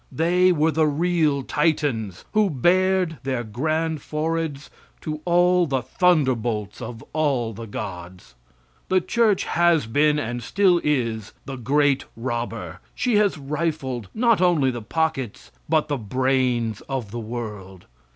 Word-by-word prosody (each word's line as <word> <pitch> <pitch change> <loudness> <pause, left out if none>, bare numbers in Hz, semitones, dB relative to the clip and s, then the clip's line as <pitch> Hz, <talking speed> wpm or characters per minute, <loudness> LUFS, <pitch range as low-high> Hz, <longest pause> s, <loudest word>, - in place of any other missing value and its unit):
They 180 +3 +3
were 160 -1 +2
the 155 0 +2
real 155 -2 +1
Titans 135 - -1
who 215 -2 +3
bared 180 +3 +2
their 130 -2 -2
grand 155 +7 -1
foreheads 155 -1 -3 0.3
to 155 -1 -5
all 175 0 +4
the 135 -3 -1
thunderbolts 125 - +1
of 115 -1 -7
all 135 -7 0
the 115 +2 -8
gods. 95 - -8 0.6
The 185 - +4
church 220 +1 +2
has 170 -4 +2
been, 150 +6 +2
and 120 -3 -3
still 180 - +2
is, 115 -7 -1
the 135 - -5
great 140 +3 +1
robber. 120 -1 -4 0.2
She 245 -4 +1
has 205 -5 +2
rifled 140 - -3
not 230 -4 +3
only 165 -8 +3
the 120 -1 -6
pockets 145 -1 -2 0.2
but 155 -1 +2
the 145 - -1
brains 125 -1 0
of 130 -7 -3
the 120 - -4
world. 105 -5 -7
145 Hz, 135 wpm, -23 LUFS, 120-165 Hz, 0.6 s, all